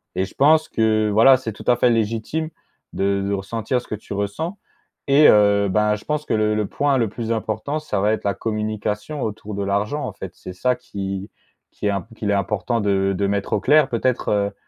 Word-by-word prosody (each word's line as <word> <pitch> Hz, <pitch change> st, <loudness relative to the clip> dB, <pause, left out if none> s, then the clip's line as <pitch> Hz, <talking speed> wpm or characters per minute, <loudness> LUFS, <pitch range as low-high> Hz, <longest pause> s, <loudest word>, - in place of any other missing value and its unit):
et 95 Hz, -, +1 dB
je -, -, -13 dB
pense 155 Hz, +3 st, +4 dB
que, 110 Hz, -1 st, +2 dB
voilà, 115 Hz, +6 st, +7 dB
c'est 120 Hz, -3 st, -5 dB
tout -, -, -12 dB
à 125 Hz, -, +5 dB
fait 120 Hz, +1 st, +3 dB
légitime 115 Hz, +8 st, -1 dB, 0.4 s
de 100 Hz, 0 st, 0 dB
de 100 Hz, -, -1 dB
ressentir 110 Hz, +5 st, -2 dB
ce -, -, -17 dB
que -, -, -2 dB
tu 105 Hz, -, -9 dB
ressens 105 Hz, -, -3 dB, 0.5 s
et 145 Hz, +2 st, +6 dB
heu, 100 Hz, -1 st, +4 dB
ben, 105 Hz, +2 st, +2 dB
je 105 Hz, -, -12 dB
pense 150 Hz, 0 st, -2 dB
que -, -, -2 dB
le 105 Hz, 0 st, +1 dB
le 105 Hz, -, 0 dB
point 145 Hz, -1 st, +1 dB
le 115 Hz, -4 st, +1 dB
plus 115 Hz, +2 st, -4 dB
important 110 Hz, +7 st, -2 dB
ça 155 Hz, -9 st, -3 dB
va 105 Hz, +2 st, +2 dB
être -, -, -3 dB
la 100 Hz, -, +1 dB
communication 110 Hz, +5 st, -3 dB
autour 105 Hz, -1 st, -5 dB
de 100 Hz, -, -2 dB
l'argent 100 Hz, +9 st, -1 dB
en -, -, -5 dB
fait. -, -, -8 dB
C'est 90 Hz, -, -9 dB
ça 125 Hz, +8 st, +1 dB
qui 100 Hz, -4 st, -6 dB, 0.4 s
qui 105 Hz, -, -4 dB
est -, -, +2 dB
imp 100 Hz, +1 st, -3 dB
qu'il 105 Hz, -2 st, -2 dB
est -, -, +3 dB
important 105 Hz, +4 st, -1 dB
de 95 Hz, -1 st, +1 dB
de 100 Hz, -, +1 dB
mettre 100 Hz, 0 st, -2 dB
au -, -, +2 dB
clair 150 Hz, 0 st, +4 dB
peut-être, 120 Hz, +1 st, 0 dB
heu, 100 Hz, -1 st, +1 dB
110 Hz, 225 wpm, -21 LUFS, 100-125 Hz, 0.5 s, voilà